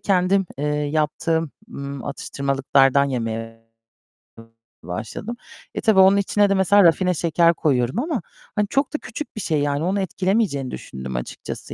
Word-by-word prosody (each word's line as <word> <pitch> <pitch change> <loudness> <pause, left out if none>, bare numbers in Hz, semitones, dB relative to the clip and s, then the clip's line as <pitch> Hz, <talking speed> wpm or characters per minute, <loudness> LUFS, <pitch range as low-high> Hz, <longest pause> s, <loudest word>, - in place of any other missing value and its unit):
kendim, 190 0 +2
eee, 145 - -2
yaptığım, 155 +2 0 0.2
ımm, 140 - -6
atıştırmalıklardan 140 -1 +1
yemeye 115 -3 -4 1.2
başladım. 110 - -5 0.4
E - - -2
tabii 220 -4 +4
onun 190 +1 +7
içine 200 +1 +2
de, 195 - +3
mesela, 195 +2 +5
rafine 180 +2 +4
şeker 170 +1 +3
koyuyorum 130 - 0
ama 290 -2 -1 0.3
hani 210 -1 +1
çok 275 +1 0
da - - 0
küçük 295 0 -7
bir 215 - -4
şey, 155 -5 0
yani 145 +1 0
onu 195 +3 0
etkilemeyeceğini 185 - 0
düşündüm 65 -1 -7
açıkçası - - -6
160 Hz, 145 wpm, -22 LUFS, 135-195 Hz, 1.2 s, onun